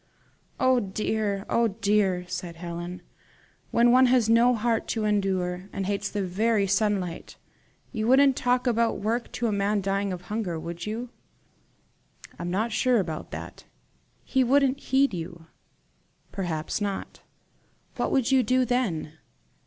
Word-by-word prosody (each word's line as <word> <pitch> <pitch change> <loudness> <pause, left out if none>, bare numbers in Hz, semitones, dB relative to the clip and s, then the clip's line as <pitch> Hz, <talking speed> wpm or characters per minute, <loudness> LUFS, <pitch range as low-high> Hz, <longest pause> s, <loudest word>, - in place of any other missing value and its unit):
"Oh 255 -1 +4
dear! 205 -1 -2
oh 235 0 +2
dear!" 200 -3 +1
sighed 180 -1 -5
Helen 175 +1 -6 0.7
"when 235 +1 +4
one 255 +1 +6
has 245 -3 +3
no 240 +2 +5
heart 225 0 0
to 220 -2 -1
endure, 190 -3 -1
and 195 -1 -3
hates 205 +1 -2
the 205 -1 -2
very 205 +3 +1
sunlight! 195 -3 -1 0.5
You 220 -2 -2
wouldn't 270 +1 +5
talk 250 0 +1
about 235 -1 +1
work 230 +3 -2
to 240 - -2
a 225 - +1
man 205 +1 +1
dying 195 0 -1
of 180 -1 -6
hunger, 185 -4 -3
would 170 +3 -6
you?" 230 +3 -4 1.3
"I'm 175 - -3
not 215 +6 -1
sure 235 +2 +2
about 160 -5 -4
that." - - -8 0.6
"He 265 -1 +1
wouldn't 275 +1 +3
heed 275 -3 +2
you." 170 -1 -6 0.9
"Perhaps 170 -1 -3
not." 200 -1 -4 0.8
"What - - -1
would 265 -1 +2
you 265 -1 +5
do 255 0 +2
then?" 180 -11 -2
210 Hz, 145 wpm, -26 LUFS, 185-240 Hz, 1.3 s, one